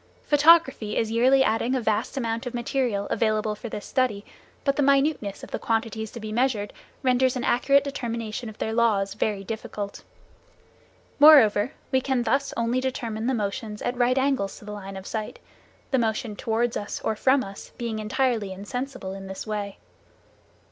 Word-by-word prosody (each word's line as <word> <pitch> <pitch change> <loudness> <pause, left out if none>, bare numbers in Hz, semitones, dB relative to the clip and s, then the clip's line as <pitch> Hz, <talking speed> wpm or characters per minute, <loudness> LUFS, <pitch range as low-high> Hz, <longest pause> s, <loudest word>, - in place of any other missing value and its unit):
Photography 290 -7 +4
is 225 -1 0
yearly 260 +4 +4
adding 230 +2 +1
a - - +1
vast 220 +3 -1
amount 230 -1 -2
of 245 - -5
material 240 -5 -1
available 215 -1 +1
for 220 +3 -7
this 210 - -6
study, 245 -6 0 0.4
but 275 -1 +1
the 290 - +1
minuteness 275 -7 +1
of - - -9
the - - -3
quantities 225 -1 -1
to 235 - -9
be 215 -1 -6
measured 225 -3 0 0.3
renders 255 0 +3
an 250 - -2
accurate 275 +3 +3
determination 235 -4 -4
of 215 - -12
their 220 - -2
laws 215 -4 +2
very 205 -1 -1
difficult. 205 -1 -6 1.2
Moreover, 270 -5 +7 0.2
we 260 -1 +3
can 260 -2 0
thus 275 +5 0
only 235 +2 +1
determine 235 -4 -3
the 260 - +1
motions 210 0 -3
at 245 - -1
right 250 +1 +2
angles 265 -7 0
to - - -13
the 210 - -7
line 195 -1 -7
of 190 - -9
sight, 215 0 -4 0.5
the 265 - +3
motion 220 -1 -1
towards 230 +2 -1
us 205 - -4
or 220 - -1
from 260 +4 +3
us 195 0 -10
being 230 -2 -3
entirely 215 -1 0
insensible 225 +1 -5
in 195 0 -8
this 190 0 -6
way. 205 -2 -4
230 Hz, 175 wpm, -25 LUFS, 210-260 Hz, 1.2 s, Moreover